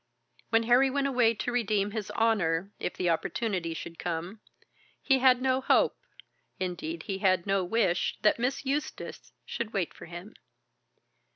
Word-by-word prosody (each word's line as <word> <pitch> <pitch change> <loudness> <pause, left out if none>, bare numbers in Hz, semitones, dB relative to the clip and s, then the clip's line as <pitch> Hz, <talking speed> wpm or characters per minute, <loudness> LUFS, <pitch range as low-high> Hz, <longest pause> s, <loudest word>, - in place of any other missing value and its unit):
"When 225 0 +3
Harry 245 +4 +5
went 280 +1 0
away 245 -4 +3
to 245 - -3
redeem 210 -4 0
his 210 -2 -4
honour, 195 -5 +1
if - - -3
the 180 - -1
opportunity 170 -1 -2
should 165 +1 -8
come, 175 +5 -4 0.6
he 270 -2 +3
had 255 -1 +4
no 260 0 +2
hope, - - +3 0.6
indeed 170 -3 -4
he 195 -1 -4
had 185 -3 +2
no 195 -1 +1
wish, 185 -2 +1
that 215 - +4
Miss 260 +3 -1
Eustace 285 +3 -4
should 230 -1 -4
wait 190 -5 -1
for - - -12
him. 175 +6 -9
210 Hz, 155 wpm, -29 LUFS, 180-245 Hz, 0.6 s, Harry